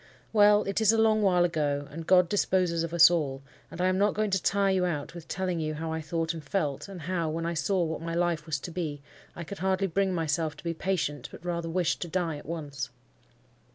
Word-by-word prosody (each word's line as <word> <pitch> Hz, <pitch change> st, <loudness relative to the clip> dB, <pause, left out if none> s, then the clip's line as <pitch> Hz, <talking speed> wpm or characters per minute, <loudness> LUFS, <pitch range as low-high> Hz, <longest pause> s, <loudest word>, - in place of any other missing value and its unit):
Well, 210 Hz, -1 st, +6 dB
it 200 Hz, +2 st, -1 dB
is 220 Hz, -1 st, +6 dB
a 225 Hz, -, +1 dB
long 220 Hz, -1 st, +4 dB
while 180 Hz, -3 st, +4 dB
ago, 145 Hz, -4 st, -1 dB
and 165 Hz, +2 st, -7 dB
God 180 Hz, -1 st, +6 dB
disposes 180 Hz, -3 st, +1 dB
of 165 Hz, 0 st, -3 dB
us 170 Hz, 0 st, +7 dB
all, 140 Hz, -5 st, -1 dB, 0.3 s
and -, -, -10 dB
I 180 Hz, -, +2 dB
am 185 Hz, 0 st, +2 dB
not 205 Hz, 0 st, +2 dB
going 215 Hz, 0 st, 0 dB
to 190 Hz, -1 st, +1 dB
tire 200 Hz, -1 st, +2 dB
you 185 Hz, -1 st, +1 dB
out 160 Hz, -5 st, -2 dB
with 170 Hz, -2 st, -10 dB
telling 180 Hz, -2 st, -2 dB
you 155 Hz, -1 st, -2 dB
how 160 Hz, +1 st, -4 dB
I 160 Hz, -, -3 dB
thought 165 Hz, +1 st, -2 dB
and 160 Hz, -2 st, -7 dB
felt, 150 Hz, -7 st, -2 dB
and 190 Hz, -3 st, -8 dB
how, 170 Hz, 0 st, -1 dB
when 165 Hz, +2 st, -3 dB
I 170 Hz, -, -1 dB
saw 180 Hz, +3 st, +1 dB
what 160 Hz, -1 st, -3 dB
my 165 Hz, 0 st, -3 dB
life 170 Hz, -3 st, 0 dB
was 150 Hz, -3 st, -1 dB
to 175 Hz, -, -6 dB
be, 155 Hz, -5 st, -4 dB, 0.3 s
I 170 Hz, -, -6 dB
could 200 Hz, +4 st, -8 dB
hardly 190 Hz, +1 st, +1 dB
bring 195 Hz, +1 st, +1 dB
myself 160 Hz, -2 st, -1 dB
to -, -, -13 dB
be 170 Hz, -1 st, -2 dB
patient, 165 Hz, -4 st, -2 dB
but 175 Hz, -, -12 dB
rather 170 Hz, -1 st, -2 dB
wished 175 Hz, 0 st, 0 dB
to 175 Hz, -, -2 dB
die 165 Hz, -2 st, -1 dB
at 145 Hz, -, -12 dB
once. 145 Hz, -6 st, -4 dB
170 Hz, 245 wpm, -28 LUFS, 160-190 Hz, 0.3 s, us